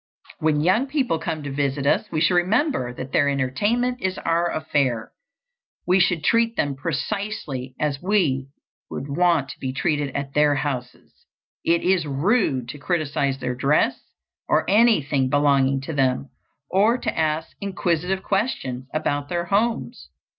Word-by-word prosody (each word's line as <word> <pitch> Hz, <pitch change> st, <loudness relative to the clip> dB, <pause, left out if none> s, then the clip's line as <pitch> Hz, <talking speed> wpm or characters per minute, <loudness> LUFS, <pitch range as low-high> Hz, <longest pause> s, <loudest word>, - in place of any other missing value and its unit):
When 155 Hz, -1 st, +2 dB
young 190 Hz, -, +2 dB
people 265 Hz, -, 0 dB
come 160 Hz, -2 st, -4 dB
to 145 Hz, -, -5 dB
visit 140 Hz, 0 st, -1 dB
us 210 Hz, +8 st, +1 dB
we 155 Hz, -2 st, -1 dB
should 170 Hz, +3 st, +3 dB
remember 185 Hz, -, +1 dB
that 130 Hz, +2 st, -7 dB
their 145 Hz, -1 st, +3 dB
entertainment 205 Hz, -, 0 dB
is 185 Hz, 0 st, -1 dB
our 170 Hz, +1 st, 0 dB
affair. 135 Hz, -7 st, -1 dB, 0.7 s
We 185 Hz, +2 st, +3 dB
should 175 Hz, -3 st, +2 dB
treat 230 Hz, +3 st, +2 dB
them 145 Hz, -1 st, 0 dB
precisely 140 Hz, -3 st, -4 dB
as 145 Hz, -2 st, -1 dB
we 170 Hz, -10 st, +1 dB, 0.4 s
would 135 Hz, -, -5 dB
want 160 Hz, -1 st, +2 dB
to -, -, -9 dB
be 130 Hz, -, -3 dB
treated 145 Hz, -1 st, -1 dB
at 140 Hz, -1 st, -3 dB
their 150 Hz, -1 st, +4 dB
houses. 130 Hz, -3 st, -5 dB, 0.4 s
It 170 Hz, 0 st, +2 dB
is 180 Hz, -4 st, +2 dB
rude 140 Hz, -, +1 dB
to 145 Hz, -, -7 dB
criticise 140 Hz, -4 st, -1 dB
their 125 Hz, -1 st, -3 dB
dress 140 Hz, +4 st, +1 dB, 0.5 s
or -, -, +2 dB
anything 170 Hz, -, +3 dB
belonging 140 Hz, -1 st, +3 dB
to 150 Hz, +4 st, -5 dB
them, 135 Hz, -1 st, 0 dB, 0.4 s
or 210 Hz, -, +3 dB
to -, -, -3 dB
ask 160 Hz, 0 st, -1 dB
inquisitive 190 Hz, -1 st, -1 dB
questions 130 Hz, -, -2 dB
about 145 Hz, -2 st, -1 dB
their 175 Hz, -1 st, -1 dB
homes. 185 Hz, -, -1 dB
150 Hz, 150 wpm, -23 LUFS, 135-185 Hz, 0.7 s, their